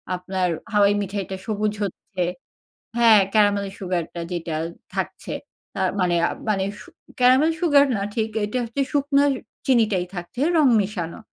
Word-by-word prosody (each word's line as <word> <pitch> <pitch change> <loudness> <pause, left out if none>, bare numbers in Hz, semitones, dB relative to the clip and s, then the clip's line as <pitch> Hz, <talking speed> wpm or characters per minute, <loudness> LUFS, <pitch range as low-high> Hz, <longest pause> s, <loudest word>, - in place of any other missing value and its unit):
আপনার 180 0 -2 0.2
হাওয়াই 205 0 +5
মিঠাইটা 195 -1 -4
সবুজ 215 -1 0
হচ্ছে। 185 -1 -4 0.7
হ্যাঁ, 230 -3 +7
caramel 205 -2 +3
sugar 180 -3 -1
টা 170 - -3
যেটা 165 -2 -3 0.4
থাকছে। - - -4 0.5
আ - - 0 0.2
মানে, 175 -1 +2 0.3
মানে 195 -2 +1 0.2
সু - - -13 0.3
caramel 260 +6 +5
sugar 290 -5 +5
না 200 - -3
ঠিক 220 -1 0 0.2
এটা 210 +5 -3
হচ্ছে 235 +5 -3
শুকনো 285 0 +3 0.4
চিনিটাই 215 -8 +3
থাকছে 175 +8 -6 0.2
রং 295 -4 +5
মেশানো। 185 -5 -4
205 Hz, 140 wpm, -23 LUFS, 185-240 Hz, 0.7 s, হ্যাঁ